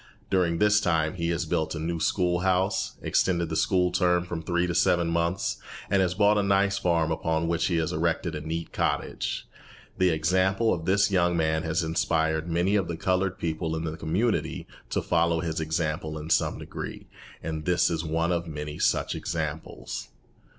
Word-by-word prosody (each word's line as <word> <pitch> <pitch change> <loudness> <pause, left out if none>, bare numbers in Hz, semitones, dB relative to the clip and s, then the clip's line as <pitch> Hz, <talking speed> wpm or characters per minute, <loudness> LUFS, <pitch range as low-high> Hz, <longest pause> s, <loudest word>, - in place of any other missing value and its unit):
During 90 -3 +2
this 105 +2 +4
time 80 -4 +1
he 85 -2 -2
has 85 0 -1
built 80 +1 -1
a - - -4
new 85 +1 -2
school 90 +1 +1
house, 95 +1 +1
extended 85 -3 +1
the - - -2
school 90 -1 +2
term 90 -1 +2
from 85 -2 -4
three 85 +2 0
to 90 - -2
seven 85 -1 +3
months, 85 +3 0 0.3
and 100 - +4
has 90 -1 +1
bought 105 +1 +4
a - - +3
nice 100 0 +2
farm 85 -3 +1
upon 80 0 0
which 85 +1 +1
he 90 - 0
has 80 -1 0
erected 85 +1 0
a 75 - -4
neat 80 +2 -4
cottage. - - -2 0.5
The 95 -1 +4
example 95 +7 +2
of 80 -1 -4
this 100 +2 +3
young 90 -2 +2
man 80 -1 +1
has 80 +2 -1
inspired 80 0 0
many 90 +4 +1
of 95 -4 +1
the 85 - -4
coloured 95 +2 0
people 80 -2 -2
in 80 - -3
this 80 -1 -4
community 95 +9 -1 0.2
to - - -1
follow 85 -1 +2
his 80 -1 -2
example 80 -1 -2
in 80 +2 -6
some - - +2
degree; - - -7 0.4
and 80 -1 -4
this 90 -1 +2
is 80 -1 -1
one 80 +2 0
of 85 -1 -1
many 75 -1 -6
such - - +1
examples. 80 -6 -4
85 Hz, 185 wpm, -27 LUFS, 80-90 Hz, 0.5 s, this